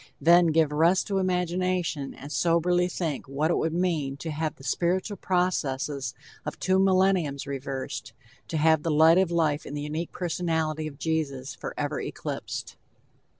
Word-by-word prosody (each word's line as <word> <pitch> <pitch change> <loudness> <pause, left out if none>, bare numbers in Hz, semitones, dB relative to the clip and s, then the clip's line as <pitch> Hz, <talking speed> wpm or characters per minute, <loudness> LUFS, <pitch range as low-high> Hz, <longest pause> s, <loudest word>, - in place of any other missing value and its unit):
Then, 175 +1 +6
give 160 -2 +3
rest 165 +5 +3
to 195 -1 +1
imagination 180 -4 -1
and 145 +2 -10
soberly 175 +2 +2
think 165 -7 -3
what 145 +5 0
it - - +2
would 160 - 0
mean 160 -7 0
to 160 +2 -5
have 155 -1 -2
the - - -16
spiritual 180 - 0
processes 145 -9 -1 0.3
of - - -5
two 190 0 +2
millenniums 185 -7 +2
reversed, 135 -1 -5 0.4
to 160 - -2
have 160 0 +4
the 165 - -2
light 160 +3 +6
of 190 -2 +2
life 160 -4 +1
in 145 - -7
the 145 - -3
unique 155 +3 -4
personally 160 -3 -1
of 140 -2 -9
Jesus 145 -5 -2
forever - - -4
eclipsed." - - -5
160 Hz, 155 wpm, -27 LUFS, 145-180 Hz, 0.4 s, Then